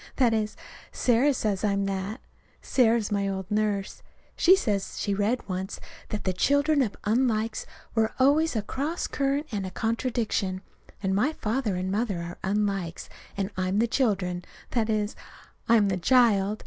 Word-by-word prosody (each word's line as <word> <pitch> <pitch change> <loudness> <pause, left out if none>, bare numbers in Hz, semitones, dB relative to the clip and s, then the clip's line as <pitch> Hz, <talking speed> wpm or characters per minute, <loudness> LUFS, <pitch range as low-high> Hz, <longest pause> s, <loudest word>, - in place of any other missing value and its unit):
That 245 -4 +3
is, 215 -1 -1 0.3
Sarah 250 +4 +3
says 215 -7 -1
I'm 200 -1 +1
that. 195 +4 -3 0.4
(Sarah 235 -3 +3
is 215 -3 -3
my 200 -1 +1
old 190 0 -4
nurse.) 210 -2 -1 0.3
She 370 +2 +6
says 205 - -2
she 200 - 0
read 210 +5 +1
it - - -26
once 190 +1 -4 0.3
that 210 - -3
the 185 - 0
children 285 - +3
of 225 -6 -1
unlikes 225 -1 0 0.3
were 220 -1 +2
always 290 +3 +3
a 215 - 0
cross 290 - -2
current 280 +2 0
and 205 -3 -2
a 185 - -4
contradiction. 225 -3 -1 0.4
And 190 0 +1
my 250 +11 +2
father 225 -5 -1
and 185 +1 -2
mother 205 -2 0
are 170 +1 -6
unlikes, 195 -4 -1 0.3
and 200 +1 -2
I'm 185 +1 0
the 225 - +4
children. 195 -8 0 0.3
That 230 -2 0
is, 210 -1 0 0.5
I'm 225 -3 +5
the 190 -2 0
child. 215 -1 +3
215 Hz, 165 wpm, -27 LUFS, 195-245 Hz, 0.5 s, She